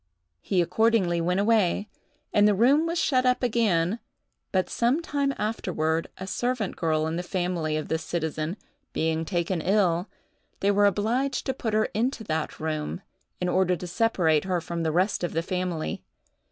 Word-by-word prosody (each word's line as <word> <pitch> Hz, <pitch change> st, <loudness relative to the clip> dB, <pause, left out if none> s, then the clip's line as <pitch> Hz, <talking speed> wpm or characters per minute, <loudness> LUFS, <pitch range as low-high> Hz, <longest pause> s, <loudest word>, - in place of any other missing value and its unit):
He 180 Hz, -3 st, +1 dB
accordingly 180 Hz, -2 st, +2 dB
went 180 Hz, +3 st, +1 dB
away, 205 Hz, -2 st, +2 dB, 0.5 s
and 205 Hz, 0 st, +5 dB
the 210 Hz, -, +3 dB
room 275 Hz, -, +4 dB
was 335 Hz, +1 st, -1 dB
shut 255 Hz, -6 st, +2 dB
up 250 Hz, 0 st, +2 dB
again; 215 Hz, -5 st, +2 dB, 0.5 s
but 185 Hz, -1 st, +1 dB
some 240 Hz, +6 st, +1 dB
time 285 Hz, -4 st, -1 dB
afterward, 165 Hz, -7 st, -1 dB
a 190 Hz, -, -6 dB
servant 240 Hz, +1 st, -2 dB
girl 155 Hz, -2 st, 0 dB
in 160 Hz, +1 st, -2 dB
the -, -, -1 dB
family 175 Hz, -4 st, -1 dB
of 155 Hz, -, -4 dB
this 160 Hz, 0 st, -1 dB
citizen, 160 Hz, +2 st, -3 dB, 0.4 s
being 160 Hz, 0 st, 0 dB
taken 175 Hz, 0 st, -1 dB
ill, 185 Hz, -1 st, +2 dB, 0.5 s
they 200 Hz, -, +3 dB
were 205 Hz, 0 st, +4 dB
obliged 240 Hz, +7 st, 0 dB
to 265 Hz, -, 0 dB
put 220 Hz, -4 st, -2 dB
her 215 Hz, -, +3 dB
into 240 Hz, +2 st, -1 dB
that 160 Hz, -5 st, -3 dB
room, 155 Hz, +3 st, -3 dB, 0.4 s
in 180 Hz, -, -1 dB
order 185 Hz, 0 st, +2 dB
to 180 Hz, -, -7 dB
separate 175 Hz, -6 st, +2 dB
her 185 Hz, -2 st, 0 dB
from 170 Hz, 0 st, -4 dB
the 160 Hz, -1 st, 0 dB
rest 185 Hz, +4 st, +1 dB
of 175 Hz, -, -2 dB
the 165 Hz, +1 st, 0 dB
family. 180 Hz, -3 st, -2 dB
185 Hz, 170 wpm, -26 LUFS, 165-220 Hz, 0.5 s, and